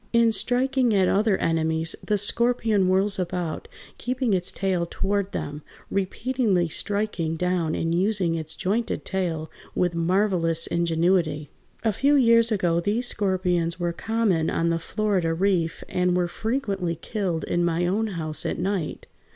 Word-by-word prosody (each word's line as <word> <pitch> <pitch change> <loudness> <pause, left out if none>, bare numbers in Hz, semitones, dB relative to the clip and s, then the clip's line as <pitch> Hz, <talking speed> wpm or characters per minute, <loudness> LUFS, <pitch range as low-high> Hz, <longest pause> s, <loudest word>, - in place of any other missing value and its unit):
In 235 -1 +4
striking 250 0 +1
at 190 -2 +3
other 205 0 +2
enemies 160 0 0
the 210 - 0
scorpion 220 -1 +1
whirls 195 +2 +4
about, 175 -2 -3 0.3
keeping 250 -2 -1
its 180 -2 0
tail 185 -3 -1
toward 200 0 -1
them, 145 +1 -5 0.3
repeatedly 200 -2 0
striking 200 -4 -2
down 175 -2 0
and 165 0 -1
using 185 -1 +1
its 160 -1 -3
jointed 220 +5 -2
tail 170 -5 -2 0.2
with 175 -1 +1
marvelous 170 -1 +2
ingenuity. 165 -3 0 0.3
A 220 -2 +1
few 280 +8 +3
years 230 -3 +4
ago 175 -5 +1
these 215 +7 -1
scorpions 180 -3 0
were 175 -1 -1
common 205 -5 0
on 165 0 0
the 165 0 0
Florida 190 -3 -1
Reef 175 -3 0
and 180 0 +1
were 175 -1 +1
frequently 200 -4 -2
killed 175 -1 -3
in 175 - 0
my 170 0 +1
own 210 +5 0
house 155 -6 -3
at - - -2
night. 185 -2 -3
185 Hz, 145 wpm, -24 LUFS, 170-210 Hz, 0.3 s, In